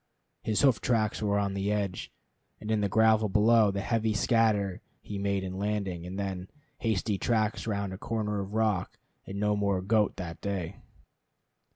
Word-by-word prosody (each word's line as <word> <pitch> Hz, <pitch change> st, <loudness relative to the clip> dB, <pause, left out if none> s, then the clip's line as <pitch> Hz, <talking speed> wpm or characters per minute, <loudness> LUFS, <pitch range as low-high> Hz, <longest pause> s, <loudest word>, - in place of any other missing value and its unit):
His 110 Hz, -2 st, 0 dB
hoof 130 Hz, -6 st, +4 dB
tracks 110 Hz, -4 st, +1 dB
were 100 Hz, -1 st, +1 dB
on 100 Hz, -1 st, 0 dB
the 100 Hz, +1 st, -1 dB
edge, 100 Hz, -3 st, -2 dB, 0.5 s
and 110 Hz, -, -4 dB
in 110 Hz, -1 st, +2 dB
the 100 Hz, -, +1 dB
gravel 110 Hz, +1 st, +4 dB
below 110 Hz, +2 st, +5 dB
the 100 Hz, 0 st, -2 dB
heavy 110 Hz, 0 st, 0 dB
scatter 105 Hz, -5 st, +2 dB, 0.2 s
he 100 Hz, -1 st, -6 dB
made 100 Hz, -1 st, 0 dB
in 95 Hz, 0 st, -5 dB
landing; 100 Hz, -4 st, -2 dB
and 95 Hz, +2 st, -6 dB
then, 95 Hz, -2 st, -4 dB, 0.3 s
hasty 105 Hz, -2 st, 0 dB
tracks 110 Hz, -1 st, 0 dB
round 100 Hz, -3 st, -2 dB
a 95 Hz, -, -8 dB
corner 105 Hz, -2 st, -2 dB
of 100 Hz, +2 st, -5 dB
rock, 110 Hz, -5 st, 0 dB, 0.3 s
and 100 Hz, +1 st, -5 dB
no 105 Hz, 0 st, +2 dB
more 100 Hz, -2 st, +1 dB
goat 105 Hz, +3 st, +2 dB
that 85 Hz, -3 st, -7 dB
day. 95 Hz, -3 st, -3 dB
100 Hz, 175 wpm, -29 LUFS, 95-110 Hz, 0.5 s, below